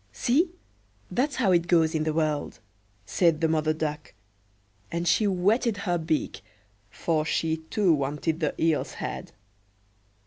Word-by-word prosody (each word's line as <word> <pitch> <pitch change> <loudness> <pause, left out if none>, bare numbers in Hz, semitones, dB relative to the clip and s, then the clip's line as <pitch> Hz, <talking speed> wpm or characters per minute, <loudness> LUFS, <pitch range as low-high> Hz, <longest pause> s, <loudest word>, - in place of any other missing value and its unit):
"See, 310 +9 +2 0.6
that's 275 +4 0
how 220 -7 +2
it 170 -1 +3
goes 165 -2 +3
in 155 -1 0
the 155 - 0
world!" 155 -2 -1 0.5
said 165 - +2
the 165 - +2
Mother 155 -1 +1
Duck; 155 -1 -4 0.8
and 170 +1 -2
she 215 - +3
whetted 205 +4 +1
her 175 -3 -1
beak, 160 -1 -2 0.5
for 155 +6 -1
she 160 +1 0
too 195 -6 +3
wanted 150 +3 -1
the 155 -4 -2
eel's 160 -2 +1
head. - - -6
165 Hz, 140 wpm, -26 LUFS, 155-185 Hz, 0.8 s, it